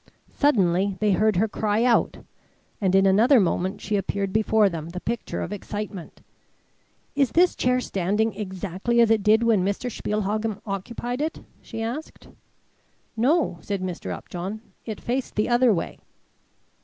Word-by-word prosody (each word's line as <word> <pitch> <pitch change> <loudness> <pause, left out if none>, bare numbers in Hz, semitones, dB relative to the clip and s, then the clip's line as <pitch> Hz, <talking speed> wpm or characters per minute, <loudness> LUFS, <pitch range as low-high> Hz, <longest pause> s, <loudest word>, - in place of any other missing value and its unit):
Suddenly 195 - +2
they 210 -1 +2
heard 215 +2 +3
her 210 +5 +2
cry 215 +1 0
out, 245 -1 +2 0.6
and 190 -1 +2
in 195 0 +5
another 225 +8 +5
moment 190 +1 0
she 210 - -2
appeared 195 0 -2
before 220 -1 +3
them, 165 -3 -4
the 180 +1 -6
picture 235 +4 -3
of 195 - -5
excitement. 205 -3 -6 0.9
"Is 275 -4 +1
this 355 +2 +4
chair 250 0 +2
standing 210 0 0
exactly 195 +3 -2
as 230 -1 +5
it 220 -2 +3
did 215 +3 +4
when 220 -5 +3
Mr. 205 +6 -2
Spielhagen 210 0 -2
occupied 235 +6 -4
it?" 315 +2 -3 0.2
she 225 -1 -6
asked. 255 +8 -6 0.9
"No," 250 - +2
said 200 -2 -3
Mr. 180 -2 -5
Upjohn, 190 +5 -6 0.3
"it 215 -2 -4
faced 255 +2 -3
the 210 - +1
other 245 0 +4
way." 175 -5 -2
210 Hz, 150 wpm, -24 LUFS, 195-235 Hz, 0.9 s, in